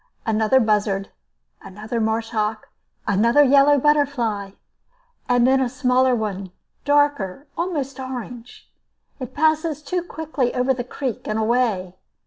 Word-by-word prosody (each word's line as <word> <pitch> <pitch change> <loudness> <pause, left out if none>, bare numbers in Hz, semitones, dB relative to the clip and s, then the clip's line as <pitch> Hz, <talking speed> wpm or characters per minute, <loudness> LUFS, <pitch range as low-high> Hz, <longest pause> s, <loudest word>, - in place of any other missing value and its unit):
Another 220 +3 +3
buzzard, 210 -3 0 0.5
another 215 +4 -5
marsh 220 +1 -1
hawk, 215 -1 -2 0.4
another 230 +8 +4
yellow 280 +1 +5
butterfly, 250 -9 0 0.8
and 245 -1 +4
then 265 +1 +3
a 255 - 0
smaller 255 0 +2
one, 200 -4 -4 0.3
darker, 285 -6 +1
almost 290 -7 -3
orange. 245 -2 -8 0.5
It 255 -3 -7
passes 310 0 +1
too 360 +2 -2
quickly 315 -7 -3
over 250 +1 +2
the 245 -1 -4
creek 250 0 -5
and 215 - -1
away. 220 -5 0
250 Hz, 120 wpm, -22 LUFS, 215-285 Hz, 0.8 s, yellow